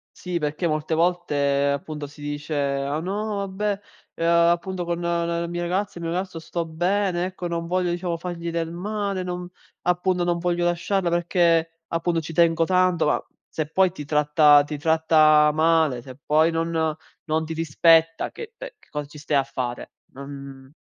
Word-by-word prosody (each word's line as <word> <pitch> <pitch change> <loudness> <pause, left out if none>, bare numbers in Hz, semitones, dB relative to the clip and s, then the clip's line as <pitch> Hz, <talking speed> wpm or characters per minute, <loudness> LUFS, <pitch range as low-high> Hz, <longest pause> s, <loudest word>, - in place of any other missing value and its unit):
Sì, 180 -1 -3
perché 150 +3 -2
molte 155 0 -1
volte 145 -5 +1
appunto 150 +1 -6
si 145 +1 -15
dice: 145 +1 -4
"Ah 140 +1 -1
no, 200 +3 -2
vabbè, 200 +1 -2 0.4
ehm, 165 - -2
appunto 170 +2 +2
con 170 0 -2
la 170 0 -1
mia 175 0 -4
ragazza, 180 +1 -2
il 170 - -5
mio 165 - -2
ragazzo 185 -2 -3
sto 170 +1 -4
bene, 175 +2 0
ecco 185 -1 -5
non 170 -1 -3
voglio 180 0 0
diciamo 175 -1 -2
fargli 170 -1 -5
del 165 -1 -2
male, 200 +2 -3
non 180 0 -4 0.4
appunto 180 0 +1
non 175 0 0
voglio 175 0 0
lasciarla 175 +1 0
perché 170 -1 +1
appunto 165 0 0
ci 160 +1 -7
tengo 165 0 +3
tanto". 185 -1 +2
Ma - - +1 0.2
se 155 -2 -3
poi 190 +3 +3
ti 150 -4 -8
tratta 150 0 +5
ti 150 0 -5
tratta 155 -1 +5
male, 160 -5 +2
se 130 +1 -11
poi 155 +2 +4
non 165 -1 0 0.3
non 160 0 0
ti 160 - -5
rispetta 165 +1 +3
che 460 -1 -9
ehm, - - -7
che - - -25
cosa 150 -1 -4
ci 150 +1 -12
stai 145 0 0
a 135 - +3
fare? 130 -3 -5 0.2
Non 140 0 -10
165 Hz, 175 wpm, -24 LUFS, 150-175 Hz, 0.4 s, tratta